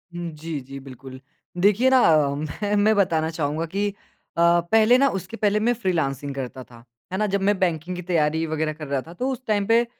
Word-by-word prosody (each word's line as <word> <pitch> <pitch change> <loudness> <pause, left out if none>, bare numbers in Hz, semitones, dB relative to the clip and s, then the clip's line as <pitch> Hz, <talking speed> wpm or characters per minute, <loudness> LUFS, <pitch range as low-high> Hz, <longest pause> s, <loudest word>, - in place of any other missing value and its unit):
हुँ, 175 -1 -4
जी 155 -1 -6
जी, 135 0 -8
बिल्कुल। 130 0 -11 0.4
देखिए 210 +7 +4
ना, 260 -1 +5 0.6
मैं 205 0 0
मैं 210 +1 +3
बताना 160 -5 +1
चाहूँगा 160 0 -2
कि 200 +5 -1 0.5
अ, 170 0 +5
पहले 225 +2 +5
ना 275 +2 +4
उसके 190 +4 -6
पहले 210 0 +1
मैं 235 +3 +2
फ़्रीलॉन्सिंग 145 - -2
करता 130 -1 -6
था, 120 -1 -17 0.3
है 190 - -1
ना? 215 - +1
जब 200 0 -1
मैं 205 0 +2
बैंकिंग 175 0 -1
की 180 - -5
तैयारी 160 -2 0
वग़ैरह 155 0 -2
कर 150 -1 -9
रहा 140 -2 -1
था 165 - -10
तो 255 +9 -2
उस 260 - -5
टाइम 205 -2 +1
पे 230 +1 +4
175 Hz, 210 wpm, -23 LUFS, 150-205 Hz, 0.6 s, ना